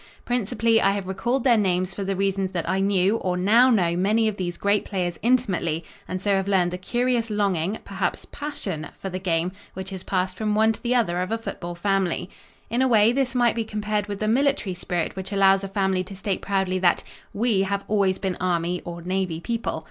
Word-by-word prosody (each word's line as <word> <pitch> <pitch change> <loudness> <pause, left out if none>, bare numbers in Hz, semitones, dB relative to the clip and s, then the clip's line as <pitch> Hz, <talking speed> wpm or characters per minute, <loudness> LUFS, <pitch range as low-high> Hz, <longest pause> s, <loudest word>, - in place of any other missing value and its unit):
Principally, 230 -1 +2
I 195 - +3
have 200 -2 -3
recalled 235 +7 -1
their 240 -4 +5
names 185 -2 0
for 200 - -4
the 195 0 -1
reason 195 0 0
that 170 -2 -2
I 190 - +1
knew 195 +2 +2
or 180 -4 -1
now 225 +8 +5
know 175 -8 +2
many 215 +5 +2
of 215 - -1
these 175 -3 -4
great 200 0 +1
players 180 -4 -3
intimately 190 -9 +1 0.2
and 185 - -3
so 200 +1 +1
have 195 0 -1
learned 185 -3 +2
the 180 - -5
curious 240 +3 0
longing 200 -2 0
perhaps 195 -2 -2
"passion" 195 - -5
for 195 - -5
the 185 - -3
game 175 -1 0 0.2
which 190 +1 -6
is 190 - -6
passed 185 0 -1
from 210 -1 0
one 220 +1 +4
to - - -12
the 245 +1 0
other 180 -7 +1
of 180 - -2
a 225 - +1
football 175 -6 -6
family. 190 -1 0 0.4
In 235 +3 0
a 260 - +4
way 220 -2 +5
this 260 0 0
might 240 -1 +4
be 230 - -1
compared 210 -1 -2
with 200 -1 -5
the 215 - -1
military 260 -4 +1
spirit 175 -1 -3
which 190 +1 -6
allows 195 -1 +4
a - - -3
family 190 -2 0
to 195 - -9
state 195 0 -2
proudly 190 -2 0
that 180 -1 +3 0.3
"we 220 -2 +1
have 200 +1 -1
always 200 -3 +2
been 190 -3 -3
Army 175 -1 0
(or 170 0 -7
Navy) 185 -2 -1
people." 230 -2 -2
195 Hz, 215 wpm, -24 LUFS, 185-220 Hz, 0.4 s, their